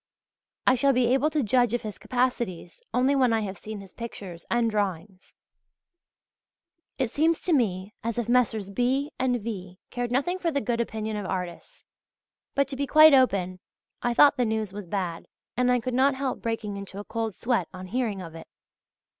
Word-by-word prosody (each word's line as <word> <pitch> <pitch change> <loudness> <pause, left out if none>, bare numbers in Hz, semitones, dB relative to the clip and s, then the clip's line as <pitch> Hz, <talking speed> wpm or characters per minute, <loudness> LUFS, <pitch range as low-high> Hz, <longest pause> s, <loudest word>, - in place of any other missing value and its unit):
I - - +6
shall 275 +2 +3
be 245 -1 +3
able 270 +3 +3
to 305 -2 0
judge 240 +1 +3
of 240 - -3
his 215 -2 -6
capacities 240 -9 -2
only 255 +4 +2
when 255 -3 +3
I 225 -1 +2
have 195 -2 -4
seen 215 +2 -8
his 195 -2 -14
pictures 195 -7 -8
and 235 -1 +2
drawings. 195 -2 -3 1.6
It 255 -4 -1
seems 320 +3 +2
to 355 - +1
me 200 -6 0
as 230 0 -2
if 240 -2 -1
Messrs. 225 -5 +1
B. 260 +7 0
and 250 -1 +1
V. 190 -5 -6
cared 245 -1 -2
nothing 320 +9 0
for 345 - 0
the 285 -3 0
good 240 -3 -1
opinion 220 -2 -3
of 205 -2 -4
artists. 180 -2 -6 0.7
But, 280 -1 +2
to 275 - -3
be 280 +1 -2
quite 310 +2 +8
open, 195 -9 +3 0.4
I 240 0 0
thought 290 +2 +6
the 250 - +2
news 220 -3 -2
was 205 -2 -7
bad, 175 -3 -3 0.3
and 250 0 +2
I 250 - +3
could 250 +1 -4
not 265 +2 +3
help 265 -1 -3
breaking 220 -3 -3
into 200 -1 -8
a 205 - -5
cold 225 -1 -3
sweat 230 -8 0
on 185 0 -8
hearing 210 -2 -2
of 165 -2 -9
it. 165 - -10
230 Hz, 190 wpm, -26 LUFS, 200-255 Hz, 1.6 s, quite